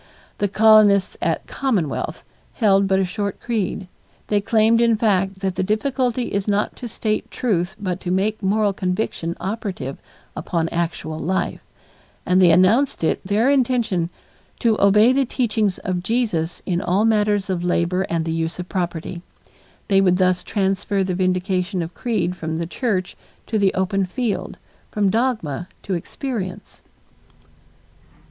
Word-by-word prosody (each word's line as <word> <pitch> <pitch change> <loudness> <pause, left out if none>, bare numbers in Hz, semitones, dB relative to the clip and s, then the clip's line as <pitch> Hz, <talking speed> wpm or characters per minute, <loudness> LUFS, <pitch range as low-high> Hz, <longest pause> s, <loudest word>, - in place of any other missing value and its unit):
The 205 - +2
colonists 210 -1 +5
at 165 -2 -1
Commonwealth 205 - -2 0.3
held 200 -3 +3
but 190 0 +2
a 190 - +2
short 200 +2 -3
creed. 205 -5 -2 0.4
They 205 -1 +2
claimed 225 +2 +3
in 230 -2 +3
fact 195 -3 +1
that 190 -1 -1
the - - -2
difficulty 245 +4 -1
is 200 0 -1
not 205 0 0
to 245 - -6
state 215 -1 -2
truth 190 -6 -1
but 185 -3 -3
to 180 - -4
make 205 +4 0
moral 205 +1 +2
conviction 180 -3 -2
operative 195 - -4 0.4
upon 165 -2 -2
actual 160 -2 -3
life, 185 +5 -1 0.7
and 185 +1 +3
they 180 - +7
announced 190 +9 +3
it 160 - 0
their 205 +5 +1
intention 235 -10 +1 0.5
"to 230 -2 +2
obey 210 +5 +6
the 275 +1 +3
teachings 220 -6 0
of 180 -1 -3
Jesus 185 -6 -1
in 175 -1 0
all 195 +3 +1
matters 210 -2 +2
of 180 -3 -2
labor 175 +1 +1
and 165 -1 -1
the 165 - -1
use 165 0 -2
of 180 0 -6
property." 175 -1 -3 0.7
They 195 -1 +4
would 180 -2 +3
thus 185 -1 +2
transfer 195 0 0
the 185 -1 -2
vindication 185 0 0
of 165 - -7
creed 195 -8 -1
from 160 -2 -4
the 170 - -2
church 185 0 -2 0.3
to 220 - -1
the 195 -2 +3
open 190 +1 0
field, 235 +2 -3 0.3
from 205 -2 +1
dogma 215 - -1 0.2
to 195 - -3
experience. 190 +2 -5
195 Hz, 150 wpm, -21 LUFS, 180-215 Hz, 0.7 s, they